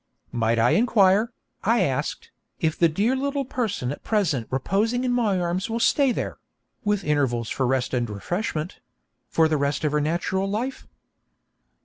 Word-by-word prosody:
'Might 115 0 +1
I 115 +2 +4
inquire,' 215 -1 +4 0.3
I 230 +2 +3
asked, 140 -4 -2 0.3
'if 160 -1 +1
the 170 - +4
dear 210 +11 +1
little 280 +1 -1
person 220 - -2
at 145 - -7
present 170 - 0
reposing 210 - 0
in 250 - +1
my 220 -6 +1
arms 175 +4 -1
will 230 +1 -1
stay 275 +3 +3
there - - -4 0.4
(with 205 -2 0
intervals 130 -6 0
for 130 - 0
rest 130 0 0
and 120 -2 0
refreshment) 165 - -3 0.5
for 160 -1 +3
the 155 -1 +1
rest 140 +2 -1
of 150 - +1
her 150 0 +1
natural 175 +5 -1
life?' 235 +6 -3
180 Hz, 160 wpm, -24 LUFS, 140-225 Hz, 0.5 s, I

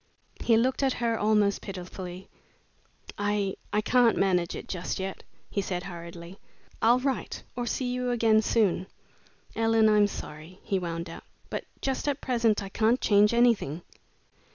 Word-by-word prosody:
He 230 -2 +4
looked 255 +4 +1
at 270 -2 +2
her 235 -1 0
almost 210 -1 +2
pitifully. 185 -1 -7 0.9
"I 205 -1 0 0.2
I 210 - +2
can't 245 +1 +4
manage 180 -3 +1
it - - -7
just 180 -2 -3
yet," 190 0 -4 0.3
he 200 - 0
said, 180 -2 -3
hurriedly. 170 0 -9 0.4
"I'll 235 +2 +5
write 265 0 -2
or 245 -1 -3
see 255 - -1
you 250 0 -1
again 225 -2 +4
soon. 205 -4 +1 0.7
Ellen, 225 -1 +3
I'm 210 -1 +5
sorry," 160 0 -9
he 195 - 0
wound 170 -1 -4
up, 165 - -9 0.3
"but - - -3 0.2
just 270 +1 -1
at 285 -1 0
present 230 -5 +1
I 195 - -6
can't 225 +5 +2
change 210 0 +4
anything." 230 - +2
210 Hz, 155 wpm, -28 LUFS, 185-235 Hz, 0.9 s, I'll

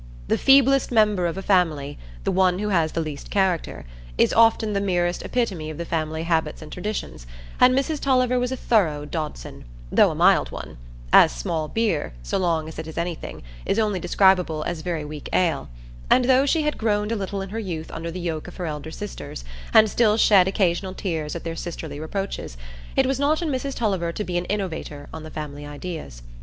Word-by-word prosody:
The - - +3
feeblest 275 0 +5
member 210 -6 +3
of 170 - -4
a 195 - -5
family—the 145 - 0
one 185 -1 +3
who 210 +2 -2
has 165 -5 +1
the 165 - 0
least 150 -3 -6
character—is - - -1
often 225 -1 +4
the 200 - 0
merest 175 -2 0
epitome 195 -11 -2
of 155 - -7
the 170 - -4
family 160 -1 -2
habits 160 -2 -1
and 150 - -11
traditions; 180 - -5 0.3
and 255 +1 +6
Mrs 290 +3 0
Tulliver 255 -2 +2
was 250 +1 -1
a 260 - -2
thorough 160 -13 +1
Dodson, 150 - -6 0.3
though - - +5
a - - -4
mild - - +4
one, - - -8 0.4
as - - +8
small 155 - -3
beer, 220 - -1
so - - -1
long 165 -4 0
as 160 - -8
it 160 - -6
is 160 - -9
anything, 170 - -4 0.2
is - - 0
only 210 -4 +1
describable 180 -3 +3
as 170 -1 -3
very 165 -3 -3
weak 150 -1 -7
ale: 165 - +1 0.4
and 255 - +5
though 260 +2 +4
she 315 +2 +2
had 300 0 -1
groaned 210 -1 0
a - - +1
little 195 -1 -3
in 195 - -8
her 220 +3 -4
youth 170 -7 -5
under 165 +1 -5
the 175 +2 -6
yoke 165 -3 -3
of - - -11
her 180 - -3
elder 150 -1 -5
sisters, 160 - -7 0.3
and 220 0 +7
still 215 0 +3
shed 195 -5 +6
occasional 190 -1 0
tears 160 -6 -3
at 170 - -5
their 165 -1 -4
sisterly 165 -3 -6
reproaches, 175 - -4 0.4
it - - +4
was 270 0 0
not 295 +2 +2
in 325 - -1
Mrs 275 0 -2
Tulliver 190 -7 0
to 210 - -4
be 180 -3 -4
an 175 - -5
innovator 165 -8 -4
on 160 - -6
the 155 - -9
family 145 -2 -7
ideas. 145 - -7
175 Hz, 200 wpm, -23 LUFS, 155-210 Hz, 0.4 s, as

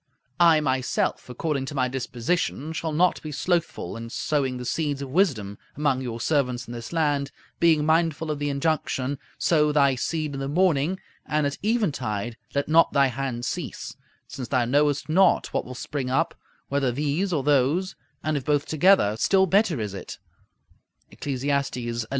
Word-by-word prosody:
I, 165 -3 +6
myself, 130 -2 -1
according 140 +2 -2
to 145 - -6
my 130 -2 +2
disposition, 135 +4 -2
shall 160 0 -3
not 175 +3 +2
be 155 - -6
slothful 165 - -1
in 115 0 -7
sowing 135 0 -1
the 125 - -6
seeds 145 0 -1
of 135 - -7
wisdom 125 - +1 0.2
among 145 -3 +1
your 120 -3 -4
servants 125 -3 0
in 120 - -7
this 115 -1 -7
land, 145 -4 0 0.3
being 160 -3 +4
mindful 160 -1 +1
of 150 - -3
the 145 0 -1
injunction, 140 -2 -1 0.2
"Sow 150 -3 +3
thy 140 -2 +4
seed 155 +3 -2
in 135 - -4
the 135 - -3
morning, 170 +2 +2 0.2
and 150 -1 0
at 140 0 -2
eventide 130 - -1 0.2
let 140 - 0
not 165 +2 +4
thy 140 -1 +4
hand 125 -2 -3
cease; - - -5 0.3
since 130 -3 -6
thou 125 -3 +1
knowest 145 +3 +2
not 180 +4 +3
what - - -1
will 125 - -8
spring 130 0 -4
up, 130 - +1 0.3
whether 140 -2 0
these 150 +9 -1
or 150 -6 0
those, 150 +7 +2 0.3
and 155 0 0
if 140 - -2
both 145 +1 +1
together, 155 - +4
still 190 - +4
better 190 - +2
is 105 -3 -3
it" 95 - -7 0.9
(Eccles. 135 -3 -4
xi. 140 -4 -1
6). 115 -1 -3
145 Hz, 175 wpm, -25 LUFS, 130-160 Hz, 0.9 s, I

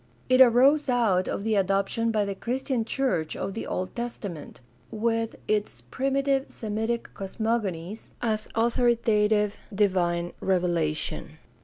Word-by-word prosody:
It 255 0 +6
arose 265 +4 +5
out 215 -7 +2
of - - -3
the 220 0 0
adoption 195 +3 +1
by 215 -2 +1
the 200 - -3
Christian 245 +3 -2
church 225 - -1
of 195 - -4
the 225 - -5
Old 185 0 -3
Testament, 210 -9 -6 0.3
with 225 +1 -1
its 210 - 0
primitive 270 - 0
Semitic 225 +2 -3
cosmogonies, 200 -2 -3
as 215 -2 -1
authoritative 225 -3 +2
divine 180 -4 +1
revelation. 170 -4 -1
215 Hz, 120 wpm, -26 LUFS, 190-235 Hz, 0.3 s, It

